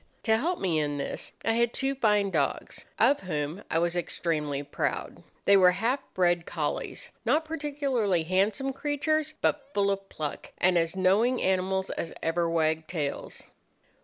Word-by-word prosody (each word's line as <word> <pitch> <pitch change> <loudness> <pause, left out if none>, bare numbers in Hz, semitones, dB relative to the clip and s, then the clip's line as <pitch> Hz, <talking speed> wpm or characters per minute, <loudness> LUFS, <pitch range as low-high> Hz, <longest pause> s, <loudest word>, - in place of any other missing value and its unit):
To 220 - +4
help 335 +10 0
me 170 -5 +1
in 145 -1 -1
this 140 - -4
I - - +3
had 235 0 +2
two 270 0 0
fine 210 -6 +2
dogs, - - -2
of 285 - +4
whom 155 0 -3
I - - +1
was 170 +1 +1
extremely 150 -5 -2
proud. - - -3 0.2
They 200 - +7
were 180 -2 +6
half 230 +8 0 0.2
bred 175 -2 +2
collies, - - -3
not 315 +1 +2
particularly 280 - 0
handsome 195 +10 +1
creatures, 305 +2 -1
but 280 -2 0
full 200 0 +3
of 195 0 -4
pluck, 150 -2 -5
and 180 0 +3
as 165 +1 +1
knowing 205 +7 +3
animals 190 0 0
as 165 - -4
ever 165 +1 +1
wagged 160 -1 +1
tails. 150 -5 -4
190 Hz, 160 wpm, -28 LUFS, 165-255 Hz, 0.2 s, They